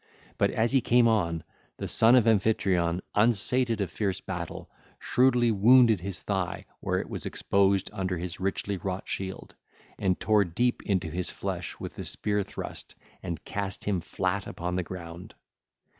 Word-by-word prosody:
But - - +4
as 115 +1 +1
he 135 -1 +4
came 120 0 +4
on, 85 -8 +1 0.3
the - - -4
son 115 +2 +5
of 125 -4 +5
Amphitryon, 95 -5 +2
unsated 115 +1 +3
of 100 - -2
fierce 95 -3 -1
battle, 90 -3 -6 0.3
shrewdly 125 -2 +3
wounded 115 +1 +6
his 95 +1 -5
thigh 95 -3 -2
where - - -1
it - - -3
was - - -5
exposed 100 -1 +1
under 95 -1 -2
his 85 0 -5
richly 95 +1 -2
wrought 95 +1 -4
shield, 95 -1 -5 0.5
and 95 -2 +1
tare 105 -2 +3
deep 120 +8 0
into 95 -5 -1
his 90 +2 -2
flesh 90 -3 -5
with - - -6
the - - -7
spear 105 -1 -1
thrust 100 - -7 0.3
and 85 -3 -5
cast 100 -1 -3
him 95 -4 0
flat 95 +3 -2
upon 90 +1 -4
the 90 - +1
ground. 85 -1 -9
95 Hz, 160 wpm, -28 LUFS, 90-110 Hz, 0.5 s, wounded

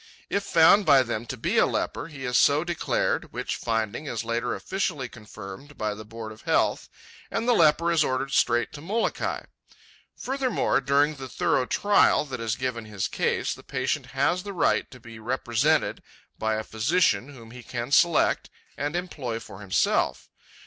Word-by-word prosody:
If 200 - +1
found 190 +3 +6
by 140 -6 +6
them 120 -1 -4
to 130 - -5
be - - +1
a - - +5
leper, - - -2
he 140 -5 -8
is 125 0 -1
so 145 +5 +4
declared, 175 -1 -1
which - - -3
finding 115 +5 -2
is 115 -4 -3
later 115 +1 -1
officially 165 -9 -2
confirmed 110 +4 -11
by 110 -1 -1
the 105 +1 -9
Board 110 0 -8
of 110 - -13
Health, - - +1 0.4
and 225 +1 -2
the 245 - +5
leper 170 -2 +4
is 165 -2 +4
ordered 130 +1 -1
straight 120 -3 +2
to 145 - -8
Molokai. 215 +8 -1 0.7
Furthermore, 260 - 0
during 140 +3 +3
the 135 -1 -7
thorough 125 +1 +1
trial 205 -6 +3
that 135 -5 -6
is 115 -1 -1
given 125 -3 -3
his 105 -3 -3
case, - - -1
the - - -12
patient - - -2
has 165 +7 +1
the 200 +1 -7
right 180 - +1
to 125 - -13
be 115 -1 -12
represented 125 +5 0 0.3
by 110 0 -1
a 110 - -2
physician 130 +5 +1
whom 115 -5 -12
he 125 +1 -10
can 120 +1 -5
select 170 +2 +3 0.3
and 145 +3 -3
employ 140 -10 -3
for 100 -2 -11
himself. 100 -2 0
130 Hz, 175 wpm, -26 LUFS, 115-160 Hz, 0.7 s, found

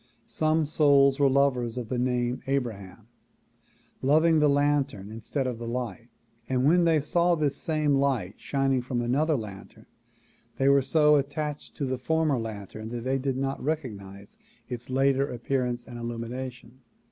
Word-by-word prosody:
Some 155 0 +1
souls 140 -2 +4
were 140 -1 +5
lovers 130 -3 +1
of 120 -3 -4
the 125 - -1
name 125 0 0
Abraham, 115 -6 -3 0.9
loving 160 +4 +4
the 150 -1 +4
lantern 140 -8 0
instead 115 +5 -3
of 125 -3 -3
the 120 - -6
light 120 0 -4 0.4
and 130 0 +1
when 170 +4 +4
they 165 -2 +4
saw 170 +4 +2
this 150 -3 0
same 155 -2 0
light 135 -9 +1
shining 135 -2 0
from 120 -1 -2
an 120 +1 0
other 155 +3 +2
lantern 105 -6 -8 0.7
they 135 - +2
were 140 0 +5
so 150 +2 +4
attached 145 +1 -4
to 140 - -2
the 130 -1 -2
former 155 -1 +1
lantern 110 -1 -7
that 120 0 -5
they 135 +1 0
did 135 -1 -2
not 135 0 -3
recognize 100 -10 -5 0.3
its 120 0 -7
later 135 +1 +2
appearance 125 0 -2
and 120 -1 -9
illumination. 120 +1 -6
130 Hz, 160 wpm, -27 LUFS, 120-145 Hz, 0.9 s, were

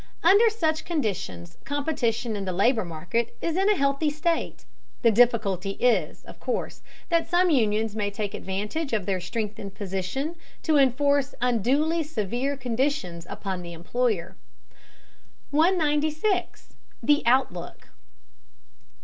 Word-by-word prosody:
Under 405 +7 +6
such 320 -8 0
conditions 190 - -3
competition 250 -6 -1
in 200 -1 -4
the 185 - -2
labor 220 +5 +2
market 175 +7 -3
is 335 -1 -2
in 385 +2 +3
a 420 - +4
healthy 280 0 +1
state. 325 +3 -2 0.4
The 230 - +6
difficulty 205 -5 +2
is, 245 -1 +1
of - - -13
course, - - -3 0.3
that 335 -1 +2
some 355 0 +3
unions 220 -5 +1
may 205 -2 0
take 205 0 -4
advantage 210 - -3
of 210 -4 0
their 190 -2 -1
strengthened 200 +1 -4
position 200 - -3 0.3
to 315 -3 +3
enforce 280 +1 +2
unduly 260 +8 +2
severe 265 -1 -2
conditions 235 - -2
upon 190 -2 -4
the 170 -1 -8
employer. 190 +2 -1 1.2
196. 315 +3 +1 0.3
THE 295 0 +4
OUTLOOK. 240 -9 0
245 Hz, 125 wpm, -26 LUFS, 200-300 Hz, 1.2 s, Under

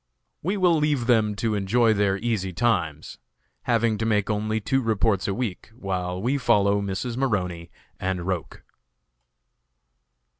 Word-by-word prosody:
We 190 +6 -1
will 180 -3 +4
leave 145 -5 +1
them 110 -4 +3
to 110 +2 -1
enjoy 110 +3 +2
their 100 -2 +1
easy 105 -4 -2
times, 85 -7 -1 0.5
having 115 -2 +1
to 110 - -1
make 105 -1 +1
only 110 +1 -1
two 135 +5 0
reports 110 -4 +1
a 100 - 0
week, 115 -5 -4
while 90 -3 -3
we 130 +8 0
follow 100 -4 +3
Mrs. 100 +5 -3
Maroney 90 -10 -1 0.3
and 90 -2 -2
Roch. 90 -5 -4
105 Hz, 140 wpm, -25 LUFS, 95-120 Hz, 0.5 s, will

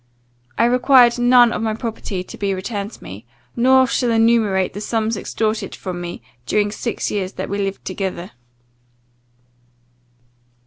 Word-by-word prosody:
I 230 - +4
required 250 0 +5
none 245 -1 +5
of - - -3
my 220 -1 -1
property 215 -5 -5
to - - -11
be 200 -1 -2
returned 200 +2 -4
to - - -14
me, 100 +4 -9 0.3
nor 260 +2 +5
shall 245 0 0
enumerate 225 -4 +2
the 205 - -6
sums 225 0 -1
extorted 215 0 -3
from 180 -2 -6
me 175 0 -7 0.2
during 205 +7 +1
six 230 +1 -3
years 190 -2 -3
that - - -5
we 200 - -3
lived 195 -1 -3
together. 185 -1 -4
215 Hz, 145 wpm, -20 LUFS, 195-235 Hz, 0.3 s, required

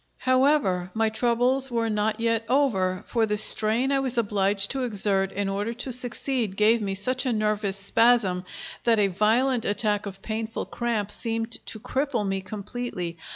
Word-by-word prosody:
However, 255 -9 +1
my 220 0 +1
troubles 245 +4 +1
were 230 -2 -1
not 215 0 -1
yet 230 0 0
over, 195 -10 0
for 230 -2 0
the 210 0 -1
strain 220 +5 +6
I 275 - +2
was 260 -2 -1
obliged 200 -2 +1
to 270 - -2
exert 195 -4 0
in 200 0 -3
order 205 +4 -3
to 245 +2 -5
succeed 245 -3 -1
gave 220 +2 +3
me 195 -2 -3
such 255 +7 0
a - - +1
nervous 210 -3 -1
spasm 200 -2 +2 0.4
that 230 -1 +3
a 205 -2 +2
violent 225 +6 +1
attack 205 0 -1
of 195 0 -10
painful 220 0 -4
cramp 225 -4 -3
seemed 225 0 -1 0.2
to 220 - -5
cripple 250 -2 -2
me 195 0 -2
completely. 195 -3 -6
220 Hz, 165 wpm, -25 LUFS, 200-245 Hz, 0.4 s, strain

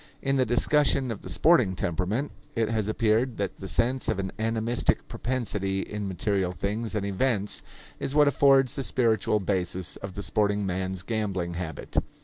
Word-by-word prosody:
In 135 0 +1
the 130 - +2
discussion 135 +1 +2
of 110 - -6
the - - -8
sporting 130 - +4
temperament, 95 - -1 0.2
it 115 -2 +1
has 110 -3 0
appeared 110 +2 +1
that 100 -1 -3
the 95 - -7
sense 120 +4 0
of 110 - +1
an 95 -1 -3
animistic 115 +1 0
propensity 105 -6 -2
in 105 0 -4
material 95 0 -1
things 105 +7 -3
and 100 -2 -1
events 100 +1 0 0.4
is 135 - -3
what 150 -1 +6
affords 135 -1 +4
the - - -2
spiritual 110 -5 +1
basis 95 -2 -1
of 100 -2 -8
the 100 - -4
sporting 105 -1 +1
man's 95 0 -2
gambling 95 -5 -2
habit. 85 -3 -6
105 Hz, 165 wpm, -27 LUFS, 95-120 Hz, 0.4 s, what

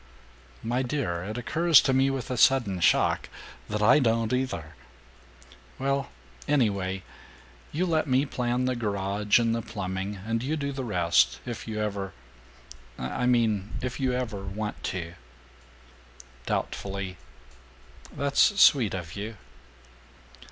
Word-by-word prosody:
"My 120 +3 0
dear, 120 -10 -2
it 105 +5 -5
occurs 165 +5 +5
to 135 - +1
me 135 +1 +3
with 135 -2 -3
a - - 0
sudden 120 -7 +3
shock 85 - +2 0.4
that 105 0 -1
I 125 +7 +6
don't 115 -2 +1
either!" 125 -12 -2 1.0
"Well 135 0 -1 0.4
anyway 100 -9 +1 0.7
you 170 +5 0
let 160 -3 +1
me 130 +2 +3
plan 125 -1 -1
the 130 0 0
garage 100 -2 +1
and 115 -1 +2
the 115 - -1
plumbing, 95 -1 -4
and 115 0 -1
you 150 +5 -1
do 140 -1 -2
the 135 -1 -4
rest, 85 - +2
if - - -6
you 110 -1 -3
ever 100 -2 -3 0.8
I 65 - -2
mean 110 -5 +1
if 130 0 -3
you 130 -2 +1
ever 120 -6 -3
want 105 +2 -5
to." 85 -2 -4 1.3
Doubtfully, 100 -2 -3 0.9
"That's 140 +8 +2
sweet 125 - +6
of 90 -2 -6
you." 105 +2 -6
115 Hz, 130 wpm, -27 LUFS, 100-130 Hz, 1.3 s, I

